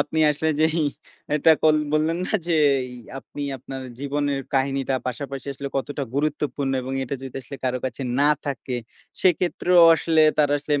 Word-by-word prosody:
আপনি 160 - -1
আসলে 150 +2 -1
যেই 160 +1 +2 0.5
এটা 160 +2 +5
কল 155 -1 +5 0.2
বললেন 155 +3 +1
না - - -5 0.2
যেই 140 -6 +2 0.3
আপনি 145 - -8 0.2
আপনার 130 +1 -7 0.2
জীবনের 140 0 -1
কাহিনীটা 135 0 +1
পাশাপাশি 135 +2 -5
আসলে 140 +1 -5
কতটা 140 +1 -3
গুরুত্বপূর্ণ 145 -1 -1
এবং 130 +1 -5
এটা 130 - -4
যদি 135 -1 -7
আসলে 140 +3 -9
কারো 125 0 0
কাছে 130 +1 -4 0.2
না 145 - +5 0.2
থাকে 130 -2 -3 0.5
সেক্ষেত্রেও 180 0 +3
আসলে 160 -1 +3 0.2
তারা 145 -1 +4
সেম 145 -1 +2
145 Hz, 155 wpm, -23 LUFS, 135-155 Hz, 0.5 s, এটা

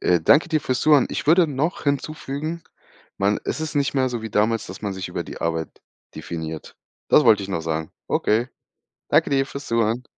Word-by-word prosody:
Äh, 90 -2 +2
danke 150 - +4
dir 155 -2 +1
fürs 130 -2 -1
Zuhören. 150 -4 +5
Ich - - -4
würde 170 +2 +5
noch 150 +4 -2
hinzufügen, 150 +2 -3 0.6
man 100 +1 +2
es - - -3
ist 155 -1 -4
nicht 140 -1 0
mehr 130 -1 +2
so 120 -2 -4
wie 110 - -5
damals, 110 +2 +1
dass 95 +4 -10
man 100 -1 -2
sich 95 -1 -5
über 90 -1 -3
die - - -9
Arbeit 80 -1 -3 0.3
definiert. 80 -2 -6 0.3
Das 150 - +5
wollte 105 -4 +5
ich 95 - -6
noch 85 -4 -2
sagen. 80 0 -3 0.2
Okay. 115 +4 +1 0.6
Danke - - +3
dir 135 -1 +2
fürs 140 +1 -8
Zuhören. 115 +2 0
120 Hz, 200 wpm, -23 LUFS, 95-145 Hz, 0.6 s, Zuhören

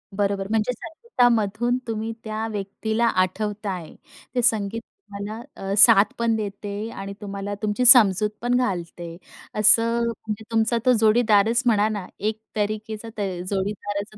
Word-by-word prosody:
बरोबर, 200 -1 -1
म्हणजे 220 +2 +1
संगीतामधून 245 - 0
तुम्ही 225 0 -3
त्या 220 0 -4
व्यक्तीला 220 +3 -2
आठवत 210 +2 -1
आहे. 180 -5 -5 0.4
ते 245 - +2
संगीत 220 -1 0
तुम्हाला 215 - -9
अ, 195 0 -4
साथ 200 -1 +8
पण 230 -1 +1
देते 205 0 -5
आणि 195 -1 -7
तुम्हाला 200 0 -5
तुमची 215 +3 0
समजूत 215 -4 +7
पण 245 +1 +1
घालते. 175 -7 -3 0.4
असं 230 +2 +4
म्हणजे 220 -1 -5
तुमचा 225 +1 +2
तो 255 - +5
जोडीदारच 220 0 +3
म्हणा 215 -3 +3
ना, 205 -4 -4
एक 215 +1 -2 0.2
तरीकेचा 215 +1 -3
त - - -3 0.3
जोडीदाराचं 205 +1 -4
215 Hz, 135 wpm, -23 LUFS, 200-230 Hz, 0.4 s, साथ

